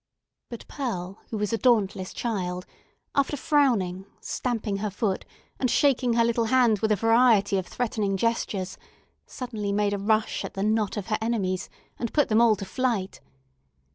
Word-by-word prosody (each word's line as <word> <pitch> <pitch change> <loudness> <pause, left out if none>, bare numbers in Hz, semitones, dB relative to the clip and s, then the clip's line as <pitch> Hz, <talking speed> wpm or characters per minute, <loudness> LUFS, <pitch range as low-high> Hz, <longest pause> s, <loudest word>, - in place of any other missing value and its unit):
But 235 - -9
Pearl, 195 -9 -4
who 220 - -3
was 210 +1 -1
a 225 - 0
dauntless 205 -6 +2
child, 180 -5 -3 0.5
after 280 +1 +1
frowning, 215 - +1
stamping 225 -5 -2
her 210 +1 -2
foot, 195 -1 -2 0.3
and 255 - +1
shaking 255 -2 +3
her 230 0 +4
little 235 0 +1
hand 235 -3 +3
with 220 +2 0
a - - +5
variety 225 -1 +4
of 185 - -6
threatening 215 -5 -1
gestures, 200 -4 -1 0.5
suddenly 220 -6 -4
made 205 0 +1
a 200 - -2
rush 215 +2 +1
at - - -7
the 195 - -2
knot 215 0 +1
of 205 - -3
her 215 - 0
enemies, 195 -5 -1 0.3
and 235 - -3
put 295 - +3
them 220 +1 +4
all 230 -2 +5
to 195 - -6
flight. 215 -2 -2
215 Hz, 170 wpm, -26 LUFS, 195-235 Hz, 0.5 s, a